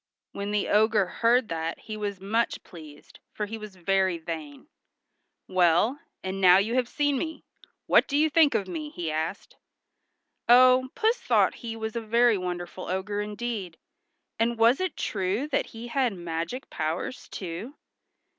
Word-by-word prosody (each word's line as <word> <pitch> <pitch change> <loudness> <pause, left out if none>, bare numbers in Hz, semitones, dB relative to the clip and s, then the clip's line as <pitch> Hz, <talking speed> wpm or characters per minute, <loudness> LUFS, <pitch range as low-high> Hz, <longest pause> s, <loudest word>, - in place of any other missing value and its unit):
When 200 0 -5
the 210 -1 0
ogre 215 -1 +3
heard 235 +5 +2
that 165 0 -3
he 215 - -7
was 205 -2 -4
much 220 +5 -1
pleased, 155 -4 -14
for 210 - -3
he 225 +2 -7
was 215 -2 -9
very 190 0 +1
vain. 160 -4 -7 0.8
"Well, 185 - +3 0.2
and 190 +1 -4
now 180 -1 +8
you 210 +4 +1
have 250 -1 +1
seen 290 -2 0
me, 320 -1 -5 0.4
what - - +4
do 285 - 0
you 310 +1 +4
think 310 -1 +4
of 200 - 0
me?" 310 -3 -5
he 170 - -4
asked. 155 +1 -4 0.9
Oh, 255 +1 +6
Puss 460 +1 +2
thought - - +3
he 230 -2 -5
was 220 0 -5
a 235 - -1
very 230 +1 +3
wonderful 180 -1 -5
ogre 190 +3 -2
indeed. 210 -4 -5 0.6
And 230 +1 +1
was 230 +3 +4
it 370 -4 -2
true 200 +7 -1
that 280 - 0
he 230 +1 -9
had 255 -4 +1
magic 175 +8 -5
powers, 160 +11 -3
too? 190 - -6
210 Hz, 160 wpm, -27 LUFS, 180-245 Hz, 0.9 s, now